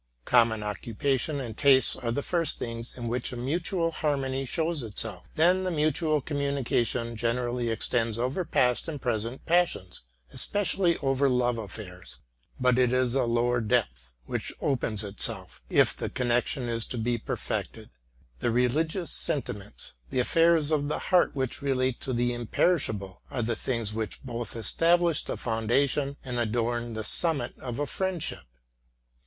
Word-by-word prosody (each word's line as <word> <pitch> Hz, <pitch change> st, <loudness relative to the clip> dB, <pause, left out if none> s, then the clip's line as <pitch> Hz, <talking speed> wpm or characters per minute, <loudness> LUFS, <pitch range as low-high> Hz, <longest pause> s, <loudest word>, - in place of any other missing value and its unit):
Common 115 Hz, -3 st, +3 dB
occupation 120 Hz, -, -1 dB
and 120 Hz, -5 st, -5 dB
tastes 135 Hz, 0 st, +5 dB
are 120 Hz, -3 st, -3 dB
the 145 Hz, +4 st, -2 dB
first 170 Hz, -3 st, +2 dB
things 115 Hz, +1 st, -5 dB
in 120 Hz, -1 st, -4 dB
which 120 Hz, +1 st, -1 dB
a 125 Hz, -, -6 dB
mutual 165 Hz, +6 st, -1 dB
harmony 135 Hz, -4 st, -1 dB
shows 160 Hz, +3 st, 0 dB
itself; 105 Hz, -4 st, -5 dB
then 180 Hz, +4 st, +4 dB
the 185 Hz, -, 0 dB
mutual 155 Hz, -1 st, +1 dB
communication 130 Hz, -5 st, -1 dB
generally 120 Hz, +1 st, -1 dB
extends 115 Hz, 0 st, 0 dB
over 130 Hz, +10 st, -1 dB
past 125 Hz, -5 st, +2 dB
and 155 Hz, -3 st, -4 dB
present 115 Hz, +1 st, -2 dB
passions, 170 Hz, -, +1 dB, 0.3 s
especially 195 Hz, -4 st, +2 dB
over 135 Hz, 0 st, +2 dB
love 125 Hz, -2 st, +1 dB
affairs: 95 Hz, -3 st, -6 dB, 0.4 s
but 125 Hz, 0 st, +3 dB
it 125 Hz, -1 st, +4 dB
is 125 Hz, -1 st, +2 dB
a 135 Hz, -, +2 dB
lower 120 Hz, +1 st, +1 dB
depth -, -, -1 dB
which -, -, -3 dB
opens 115 Hz, -6 st, 0 dB
itself, 100 Hz, 0 st, -3 dB
if -, -, +4 dB
the -, -, -4 dB
connection 125 Hz, +1 st, 0 dB
is 115 Hz, -1 st, 0 dB
to 125 Hz, -, -3 dB
be 120 Hz, +1 st, 0 dB
perfected; -, -, -4 dB, 0.5 s
the -, -, 0 dB
religious 155 Hz, +9 st, +1 dB
sentiments, 105 Hz, -8 st, -2 dB, 0.2 s
the -, -, -1 dB
affairs 165 Hz, +3 st, +4 dB
of 145 Hz, -2 st, +1 dB
the 150 Hz, -, -1 dB, 0.2 s
heart 180 Hz, -, +4 dB
which 130 Hz, -1 st, -1 dB
relate 130 Hz, -2 st, 0 dB
to 130 Hz, -, -3 dB
the 120 Hz, 0 st, +1 dB
imperishable, 115 Hz, -, 0 dB
are 120 Hz, -, -2 dB
the 115 Hz, +1 st, -1 dB
things 115 Hz, -2 st, -2 dB
which 110 Hz, -1 st, -3 dB
both 120 Hz, -4 st, -2 dB
establish 165 Hz, -, +2 dB
the -, -, -4 dB
foundation 135 Hz, +5 st, +1 dB
and 125 Hz, -2 st, -2 dB
adorn 120 Hz, 0 st, -1 dB
the 110 Hz, -, -3 dB
summit 140 Hz, +1 st, +1 dB
of 125 Hz, -3 st, -5 dB
a 145 Hz, -, 0 dB
friend 190 Hz, +1 st, -2 dB
ship. -, -, -3 dB
125 Hz, 155 wpm, -28 LUFS, 115-145 Hz, 0.5 s, tastes